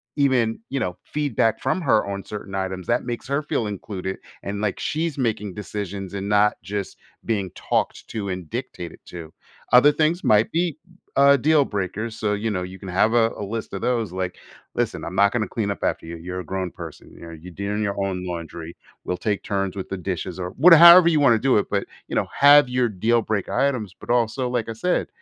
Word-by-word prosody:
even, 130 Hz, -6 st, +2 dB
you 135 Hz, -, -2 dB
know, 90 Hz, -6 st, -3 dB
feedback 140 Hz, -7 st, 0 dB
from -, -, 0 dB
her 110 Hz, -9 st, +3 dB
on 100 Hz, 0 st, -4 dB
certain 100 Hz, -2 st, -7 dB
items 95 Hz, -1 st, -3 dB
that 120 Hz, +1 st, +1 dB
makes 120 Hz, 0 st, -5 dB
her 140 Hz, +3 st, -1 dB
feel 140 Hz, -7 st, -1 dB
included 95 Hz, -2 st, -5 dB, 0.3 s
and, 100 Hz, +1 st, -4 dB
like, 105 Hz, -3 st, -1 dB
she's 160 Hz, -1 st, -2 dB
making 110 Hz, -6 st, -1 dB
decisions 100 Hz, -1 st, -6 dB
and 100 Hz, 0 st, -4 dB
not 105 Hz, 0 st, +3 dB
just 100 Hz, -1 st, -5 dB, 0.3 s
being 100 Hz, -5 st, -1 dB
talked -, -, -2 dB
to 105 Hz, -3 st, -4 dB
and 90 Hz, -3 st, -5 dB
dictated 115 Hz, -9 st, -6 dB
to. 85 Hz, -2 st, -9 dB, 0.4 s
Other 125 Hz, +4 st, +8 dB
things 160 Hz, +4 st, 0 dB
might 105 Hz, +1 st, +3 dB
be, 170 Hz, -2 st, 0 dB, 0.4 s
uh, 140 Hz, 0 st, +6 dB
deal 150 Hz, +2 st, +3 dB
breakers, 105 Hz, +2 st, -4 dB
so, 105 Hz, -1 st, 0 dB
you 105 Hz, +2 st, -2 dB
know, 90 Hz, -4 st, -2 dB
you 95 Hz, +1 st, -8 dB
can 95 Hz, -, -8 dB
have 100 Hz, +5 st, +2 dB
a 115 Hz, -1 st, +4 dB
a -, -, -5 dB
list 110 Hz, +1 st, -5 dB
of 95 Hz, -, -4 dB
those, 120 Hz, -6 st, 0 dB
like, 90 Hz, 0 st, -4 dB, 0.4 s
listen, -, -, -2 dB
I'm 85 Hz, -, -6 dB
not 100 Hz, +2 st, +4 dB
gonna 115 Hz, -4 st, 0 dB
clean 105 Hz, +1 st, -2 dB
up -, -, -6 dB
after -, -, -1 dB
you, 85 Hz, -, -6 dB
you're 90 Hz, +2 st, -6 dB
a -, -, -11 dB
grown 95 Hz, +1 st, -3 dB
person, -, -, -10 dB
you -, -, -15 dB
know? 85 Hz, -, -9 dB
You're 85 Hz, +2 st, -11 dB
doing 100 Hz, +3 st, -2 dB
your 100 Hz, -1 st, -2 dB
own 90 Hz, -2 st, -3 dB
laundry, 85 Hz, -1 st, -6 dB, 0.3 s
we'll 90 Hz, -, -2 dB
take 105 Hz, 0 st, -2 dB
turns 100 Hz, -2 st, -2 dB
with 95 Hz, -, -5 dB
the 95 Hz, -, -3 dB
dishes 90 Hz, 0 st, -4 dB
or 90 Hz, -1 st, -3 dB
what 170 Hz, +6 st, +8 dB
however 170 Hz, +2 st, +10 dB
you 160 Hz, -3 st, +2 dB
wanna 130 Hz, -6 st, +5 dB
do 130 Hz, 0 st, +3 dB
it, -, -, -2 dB
but, 100 Hz, -1 st, 0 dB, 0.2 s
you -, -, -5 dB
know, -, -, +1 dB
have 145 Hz, -1 st, +7 dB
your 125 Hz, -1 st, +1 dB
deal 110 Hz, +4 st, +1 dB
break 110 Hz, -3 st, -2 dB
items, 125 Hz, -9 st, 0 dB
but, -, -, -13 dB
also, 120 Hz, +1 st, +1 dB
like 120 Hz, -3 st, -1 dB
I -, -, -3 dB
said 175 Hz, +11 st, 0 dB
105 Hz, 220 wpm, -23 LUFS, 95-125 Hz, 0.4 s, however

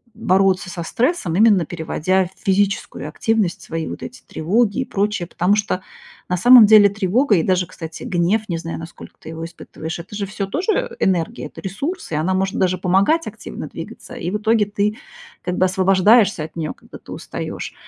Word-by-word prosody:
бороться 190 Hz, -3 st, +2 dB
со 170 Hz, -1 st, -5 dB
стрессом, 230 Hz, -, 0 dB
именно 205 Hz, -3 st, +5 dB
переводя 175 Hz, +3 st, 0 dB
в -, -, -26 dB
физическую 195 Hz, -5 st, 0 dB
активность 215 Hz, +1 st, 0 dB
свои 165 Hz, -1 st, -4 dB
вот -, -, -7 dB
эти 250 Hz, -, -9 dB
тревоги 205 Hz, +7 st, +1 dB
и -, -, -2 dB
прочее. 205 Hz, -5 st, -1 dB
Потому 180 Hz, +4 st, +1 dB
что 200 Hz, -3 st, -1 dB, 0.5 s
на 180 Hz, -, 0 dB
самом 240 Hz, +2 st, +8 dB
деле 210 Hz, -1 st, +8 dB
тревога 210 Hz, +5 st, +2 dB
и 160 Hz, -, +1 dB
даже, 185 Hz, -1 st, +1 dB
кстати, 165 Hz, -2 st, -9 dB
гнев, 185 Hz, +5 st, 0 dB
не 170 Hz, -4 st, -2 dB
знаю, 165 Hz, 0 st, -5 dB
насколько 165 Hz, 0 st, -11 dB
ты -, -, -11 dB
его 165 Hz, 0 st, -6 dB
испытываешь, 165 Hz, -1 st, -7 dB
это 180 Hz, +5 st, -9 dB
же 200 Hz, -1 st, -2 dB
всё 200 Hz, 0 st, -4 dB
тоже, 320 Hz, -, -3 dB
э, 400 Hz, -, -2 dB
энергия, 190 Hz, +5 st, 0 dB
это -, -, -12 dB
ресурс, 210 Hz, -, -5 dB
и -, -, -1 dB
она 160 Hz, +5 st, 0 dB
может 190 Hz, +1 st, -1 dB
даже 185 Hz, -1 st, +1 dB
помогать 200 Hz, -, +2 dB
активно -, -, -7 dB
двигаться. -, -, -9 dB
И 170 Hz, -, -4 dB
в 210 Hz, -, 0 dB
итоге 220 Hz, 0 st, +2 dB
ты 205 Hz, +1 st, -1 dB, 0.4 s
как 180 Hz, 0 st, -3 dB
бы 185 Hz, -, +4 dB
освобождаешься 190 Hz, 0 st, +4 dB
от 160 Hz, -, -9 dB
нее, 155 Hz, -2 st, -3 dB
когда -, -, -14 dB
ты -, -, -14 dB
устаешь. -, -, -6 dB
190 Hz, 190 wpm, -20 LUFS, 175-210 Hz, 0.5 s, самом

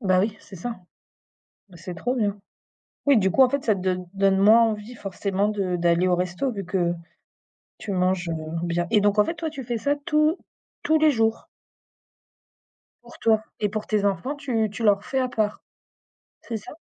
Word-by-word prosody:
Bah 185 Hz, -2 st, +3 dB
oui, 210 Hz, +2 st, -1 dB
c'est 195 Hz, -, -12 dB
ça. 230 Hz, +7 st, -5 dB, 0.9 s
Bah, 180 Hz, -, -14 dB
c'est 175 Hz, +1 st, -7 dB
trop 245 Hz, +10 st, -2 dB
bien. 205 Hz, -4 st, 0 dB, 0.7 s
Oui 280 Hz, -3 st, +6 dB
du 190 Hz, -2 st, +3 dB
coup 265 Hz, -, +5 dB
en 260 Hz, -, +6 dB
fait 280 Hz, +1 st, -2 dB
ça 215 Hz, -3 st, +3 dB
te 190 Hz, -, -6 dB
donne 185 Hz, -1 st, -1 dB
donne 195 Hz, -1 st, +2 dB
moins 215 Hz, +4 st, +6 dB
envie 220 Hz, +1 st, 0 dB
forcément 200 Hz, -1 st, -2 dB
de 195 Hz, -4 st, -1 dB
d'aller 170 Hz, +1 st, +2 dB
au 180 Hz, -, +3 dB
resto 180 Hz, +9 st, -1 dB
vu 200 Hz, -2 st, -5 dB
que 180 Hz, -2 st, 0 dB, 0.9 s
tu 205 Hz, -, -5 dB
manges, 180 Hz, -1 st, 0 dB
heu, 165 Hz, -, -1 dB, 0.3 s
bien 175 Hz, 0 st, 0 dB
et 210 Hz, -, +4 dB
donc 205 Hz, +1 st, +2 dB
en 210 Hz, -, +5 dB
fait, -, -, -2 dB
toi 320 Hz, -1 st, -4 dB
tu 275 Hz, -4 st, -7 dB
fais 235 Hz, -1 st, -3 dB
ça 285 Hz, +5 st, +1 dB
tous 305 Hz, +1 st, +2 dB, 0.5 s
tous 315 Hz, +1 st, +3 dB
les 310 Hz, -, +5 dB
jours? 225 Hz, -3 st, 0 dB, 1.6 s
Pour -, -, -15 dB
toi 220 Hz, -1 st, +3 dB, 0.2 s
et 210 Hz, -, +1 dB
pour 210 Hz, +1 st, -4 dB
tes 210 Hz, -2 st, +1 dB
enfants 205 Hz, +8 st, 0 dB
tu 235 Hz, -7 st, -1 dB
tu 210 Hz, +3 st, -7 dB
leur 205 Hz, -1 st, +3 dB
fais 265 Hz, -, -2 dB
à 255 Hz, -1 st, +1 dB
part? 215 Hz, -3 st, -1 dB, 0.8 s
C'est 230 Hz, -, -5 dB
ça? 210 Hz, -, -9 dB
210 Hz, 200 wpm, -24 LUFS, 185-240 Hz, 1.6 s, Oui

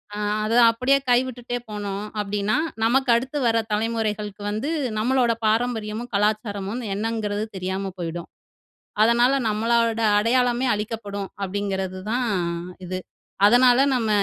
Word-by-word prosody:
"அ -, -, -5 dB, 0.3 s
அதை 225 Hz, +2 st, +1 dB
அப்படியே 255 Hz, +4 st, +2 dB
கைவிட்டுட்டே 245 Hz, -1 st, 0 dB
போனோம் 205 Hz, -1 st, -4 dB, 0.2 s
அப்படின்னா, 205 Hz, +1 st, -1 dB, 0.3 s
நமக்கு 265 Hz, +2 st, +2 dB
அடுத்து 265 Hz, +5 st, -2 dB
வர 230 Hz, 0 st, +3 dB, 0.2 s
தலைமுறைகளுக்கு 215 Hz, -2 st, -2 dB
வந்து 220 Hz, +8 st, -2 dB, 0.3 s
நம்மளோட 245 Hz, +1 st, +2 dB, 0.2 s
பாரம்பரியமும், 225 Hz, 0 st, -1 dB
கலாச்சாரமும் 210 Hz, +1 st, -1 dB
என்னங்கிறது 210 Hz, -1 st, -2 dB
தெரியாம 190 Hz, +1 st, -3 dB
போயிடும். 170 Hz, 0 st, -5 dB, 0.8 s
அதனால, 240 Hz, +3 st, +4 dB, 0.2 s
நம்மளோட 230 Hz, +1 st, +1 dB, 0.2 s
அடையாளமே 245 Hz, +2 st, +2 dB
அழிக்கப்படும்." 205 Hz, -2 st, -5 dB
அப்படிங்கிறது 190 Hz, -1 st, -3 dB
தான் 245 Hz, -1 st, 0 dB, 0.6 s
இது. 185 Hz, +1 st, -4 dB, 0.5 s
அதனால 245 Hz, +2 st, +6 dB, 0.2 s
நம்ம 230 Hz, -3 st, 0 dB
220 Hz, 110 wpm, -23 LUFS, 205-240 Hz, 0.8 s, அதனால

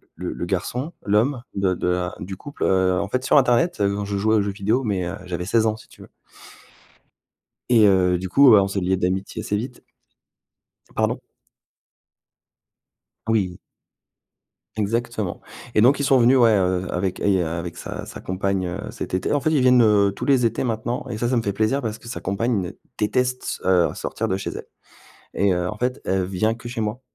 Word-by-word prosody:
le 90 Hz, +2 st, -5 dB
le 85 Hz, -, -4 dB
garçon, 125 Hz, -, -3 dB
l'homme 115 Hz, +5 st, +2 dB
de 95 Hz, -1 st, +1 dB
de 90 Hz, -, -3 dB
la 90 Hz, 0 st, -1 dB
du 95 Hz, +1 st, -7 dB
couple. 145 Hz, +5 st, -7 dB
Heu, 95 Hz, -1 st, +2 dB
en 100 Hz, -, -2 dB
fait 130 Hz, +2 st, -1 dB
sur -, -, +4 dB
internet, 130 Hz, +6 st, +3 dB
je 100 Hz, 0 st, -1 dB
jouais 110 Hz, +2 st, +2 dB
aux 105 Hz, -, +3 dB
jeux 100 Hz, 0 st, -2 dB
vidéos, 105 Hz, +6 st, 0 dB
mais, 95 Hz, -6 st, -1 dB
heu, 95 Hz, -, -4 dB
j'avais 90 Hz, -1 st, -4 dB
16 110 Hz, +3 st, +2 dB
ans 110 Hz, -, +1 dB
si -, -, -16 dB
tu -, -, -18 dB
veux -, -, -13 dB, 1.6 s
et 115 Hz, -3 st, +6 dB
heu, 90 Hz, -2 st, +3 dB
du 95 Hz, 0 st, -5 dB
coup, 140 Hz, +7 st, +6 dB
bah, 100 Hz, -2 st, +7 dB
on 100 Hz, -, -1 dB
s'est 95 Hz, 0 st, -2 dB
liés 95 Hz, +1 st, +1 dB
d'amitié 95 Hz, +2 st, -2 dB
assez 105 Hz, -, -1 dB
vite 120 Hz, +3 st, -6 dB, 1.1 s
pardon? -, -, 0 dB, 2.1 s
Oui! 100 Hz, -6 st, 0 dB, 1.2 s
Exactement 110 Hz, -2 st, -2 dB, 0.3 s
et 105 Hz, -, +4 dB
donc 130 Hz, +5 st, +5 dB
ils 140 Hz, -, -1 dB
sont 135 Hz, -2 st, +4 dB
venus 125 Hz, +2 st, +5 dB
ouais, 115 Hz, -3 st, +5 dB
heu, 95 Hz, -1 st, 0 dB
avec 90 Hz, +1 st, -2 dB
et 95 Hz, -3 st, +2 dB
avec 85 Hz, +1 st, -4 dB
sa -, -, -6 dB
sa -, -, -9 dB
compagne, 95 Hz, 0 st, -2 dB
heu, 85 Hz, -, -4 dB
cet -, -, -7 dB
été 95 Hz, -, -1 dB
en 145 Hz, -, +2 dB
fait, 155 Hz, -, 0 dB
ils 150 Hz, -4 st, +2 dB
viennent, 125 Hz, -1 st, +5 dB
heu, 100 Hz, -2 st, +4 dB
tous -, -, -5 dB
les 130 Hz, -4 st, +3 dB
étés 115 Hz, +3 st, -1 dB
maintenant 120 Hz, +1 st, -2 dB
et 110 Hz, -, -4 dB
ça 120 Hz, -, 0 dB
ça 125 Hz, -, +1 dB
me 115 Hz, -, +1 dB
fait 100 Hz, -2 st, -1 dB
plaisir 110 Hz, +7 st, 0 dB
parce 110 Hz, 0 st, -4 dB
que -, -, -16 dB
sa 120 Hz, -, -5 dB
compagne, 100 Hz, -1 st, -1 dB, 0.2 s
déteste, 125 Hz, +4 st, -1 dB
heu, 90 Hz, -3 st, +4 dB
sortir -, -, -3 dB
de 95 Hz, -, 0 dB
chez 95 Hz, -, -4 dB
elle -, -, -8 dB, 0.7 s
et 100 Hz, -1 st, +2 dB
heu, 90 Hz, 0 st, -1 dB
en 105 Hz, -, -6 dB
fait, 125 Hz, +3 st, -2 dB
elle 95 Hz, -1 st, +1 dB
vient 95 Hz, +4 st, 0 dB
que 120 Hz, -, -10 dB
chez 120 Hz, -, -5 dB
moi. 110 Hz, +4 st, -3 dB
105 Hz, 200 wpm, -22 LUFS, 95-120 Hz, 2.1 s, bah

